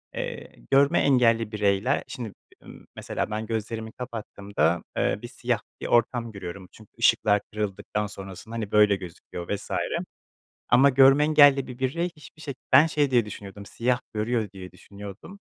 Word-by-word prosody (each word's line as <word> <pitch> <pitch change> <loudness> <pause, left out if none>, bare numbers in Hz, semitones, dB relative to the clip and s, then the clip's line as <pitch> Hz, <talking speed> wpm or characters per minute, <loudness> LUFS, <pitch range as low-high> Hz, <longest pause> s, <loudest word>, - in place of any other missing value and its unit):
eee, - - -5 0.2
görme 140 +1 +5
engelli 115 -5 +3
bireyler, 105 +4 +1
şimdi 125 -5 -6
b - - -23
ımm, - - -13
mesela - - -3
ben 110 +1 -3
gözlerimi 110 0 -4
kapattığımda, 100 - -2
eee, - - +1
bir - - -7
siyah - - -2 0.2
bir - - -3
ortam 120 0 +1
görüyorum 95 -2 -8
çünkü 110 -2 -17
ışıklar 105 -1 +4
kırıldıktan 105 0 -3
sonrasında, 95 +2 -9
hani, 110 -3 -4
böyle 105 -1 +5
gözüküyor 90 -1 -9
vs. 100 - -10 1.0
Ama 130 +3 +6
görme 135 +2 +6
engelli 145 -3 +5
bir 125 0 -9
birey 170 +7 -1
hiçbir 155 +1 -15
şe 145 -3 -5 0.2
ben 140 +4 +9
şey 145 -3 +1
diye 120 -3 +3
düşünüyordum, 100 -1 -9
siyah 120 +4 0
görüyor 110 0 -1
diye 95 -1 -9
düşünüyordum 100 - -11
110 Hz, 155 wpm, -26 LUFS, 100-130 Hz, 1.0 s, ben